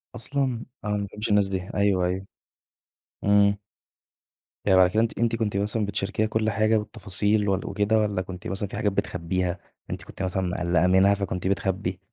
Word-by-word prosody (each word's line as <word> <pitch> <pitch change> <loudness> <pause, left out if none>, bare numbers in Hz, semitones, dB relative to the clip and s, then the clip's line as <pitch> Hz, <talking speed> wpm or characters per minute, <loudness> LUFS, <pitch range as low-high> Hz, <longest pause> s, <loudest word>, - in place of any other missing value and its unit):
أصلًا! 125 0 -1 0.2
أنا 105 0 0
ما 100 - -2
باحبّش 105 +3 -5
الناس 105 -1 +4
دي. 95 -1 -4
أيوه، 100 -3 +2
أيوه. 95 +2 -2 1.0
إمم. 100 0 +4 1.1
يعني 95 -2 +5
بعد 90 -1 +6
كده 110 +4 +2
أنتِ 115 -1 -1
أنتِ 115 0 +2
كنتِ 105 -3 -1
مثلًا 105 +1 0
بتشاركيها 100 +2 -1
كل 110 0 0
حاجة 110 +1 +2
بالتفاصيل 105 0 0
وال 95 - 0
وكده 105 +2 +2
والّا 105 -3 0
كنتِ 90 -1 -7
مثلًا 95 +1 -2
في - - -7
حاجات 105 - +1
بتخبّيها، 90 -1 -2 0.3
أنتِ - - -5
كنتِ - - -7
مثلًا 95 0 -1
مِقلَّقة 90 -1 +1
منها، 95 +2 +5
فكنتِ 95 -2 -2
بتخبّي؟ 95 -1 -1
100 Hz, 175 wpm, -25 LUFS, 95-105 Hz, 1.1 s, بعد